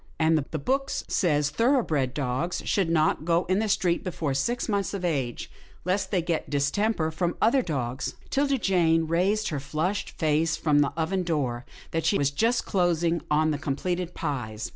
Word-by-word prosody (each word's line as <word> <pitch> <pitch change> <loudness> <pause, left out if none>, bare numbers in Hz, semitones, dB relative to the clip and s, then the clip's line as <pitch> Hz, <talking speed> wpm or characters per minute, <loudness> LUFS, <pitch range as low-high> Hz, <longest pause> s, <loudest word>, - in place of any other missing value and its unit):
" - - -30
And 160 0 +4
the 155 +1 -2
book 270 - -1
says 150 -5 0
thoroughbred 160 - +1
dogs 140 +5 -2
should 190 -5 +1
not 155 -2 +2
go 170 +2 +2
in 185 +2 +1
the 220 0 0
street 175 -3 +1
before 165 -6 -2
six 235 - -1
months 200 -2 -1
of 185 -2 -3
age, 135 -8 -2 0.3
lest 185 +2 0
they 185 -4 0
get 170 -2 -2
distemper 160 +5 0
from 170 +2 -1
other 250 +4 +4
dogs." 135 - -3 0.2
'Tilda 275 0 +2
Jane 165 -6 +2
raised 190 +6 +1
her 145 - -2
flushed 155 +8 -2
face 160 +1 +1
from 150 -3 +2
the 145 -1 +2
oven 185 +4 0
door 140 -8 -2 0.2
that 165 0 -1
she 180 +6 +2
was 140 0 +1
just 230 +12 +1
closing 170 -3 +1
on 155 +1 +3
the 145 - -2
com 140 -2 -2
pleted 180 +2 -3
pies. 125 -9 -4
165 Hz, 185 wpm, -26 LUFS, 150-190 Hz, 0.3 s, And